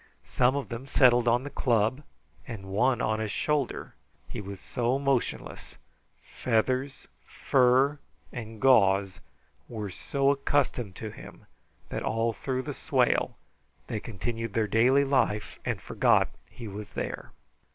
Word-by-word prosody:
Some 125 +2 +2
of 140 - -3
them 120 +2 -6
settled 125 -3 +4
on 120 +2 +3
the 145 - -7
club, 120 0 +1 0.5
and 105 -5 -7
one 120 +6 +1
on 110 0 0
his 110 -1 -2
shoulder. 150 0 -1 0.3
He - - -6
was 100 -1 -8
so 125 +1 -1
motionless; 135 -3 -2 0.5
feathers, 130 +4 -1 0.2
fur, 135 +3 +3 0.3
and 110 -2 -7
gauze 100 -7 +4 0.5
were 105 -4 -5
so 140 +8 +1
accustomed 135 -7 0
to 110 +2 -6
him, - - -12 0.4
that - - -3
all 115 +1 0
through 130 +2 -3
the - - -5
swale - - +1 0.5
they 110 - -3
continued 115 +1 -5
their 110 -1 +2
daily 125 +7 +4
life 130 -7 0
and - - -1
forgot - - +2 0.2
he 115 - -9
was 105 +1 -7
there. - - -4
120 Hz, 135 wpm, -28 LUFS, 110-135 Hz, 0.5 s, settled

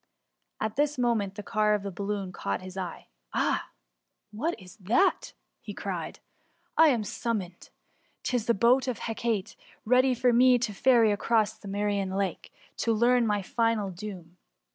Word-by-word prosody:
'' - - -53
At 220 +2 -3
this 295 0 +1
moment 225 -6 0
the 210 - -7
car 210 -1 +2
of 205 - -4
the 200 - -4
balloon 200 0 -3
caught 100 - -3
his 185 0 -9
eye: 185 -3 -6
" - - -34
Ah - - 0 0.6
1 210 - -11
what - - -9
is 180 -2 -13
that 225 - +1 0.3
i^ - - -7
cried - - -4 0.5
he; - - +2
^* - - +9
I - - +7
am 240 -7 +2
summoned! 200 -4 -4 0.5
'Tis 245 -3 -1
the 235 - +3
boat 245 +6 +3
of 250 -4 -2
Hecate, 225 -3 -2 0.3
ready 255 +2 +4
to 245 -2 +4
ferry 235 +1 +4
me - - +3
across 220 +1 +1
the 205 - -13
Mserian 200 -1 -1
Lake, 195 -4 -3 0.3
to 230 - 0
learn 240 +1 +3
my 205 -2 0
final 225 -2 0
doom. 180 -2 -9
215 Hz, 175 wpm, -28 LUFS, 195-240 Hz, 0.6 s, ^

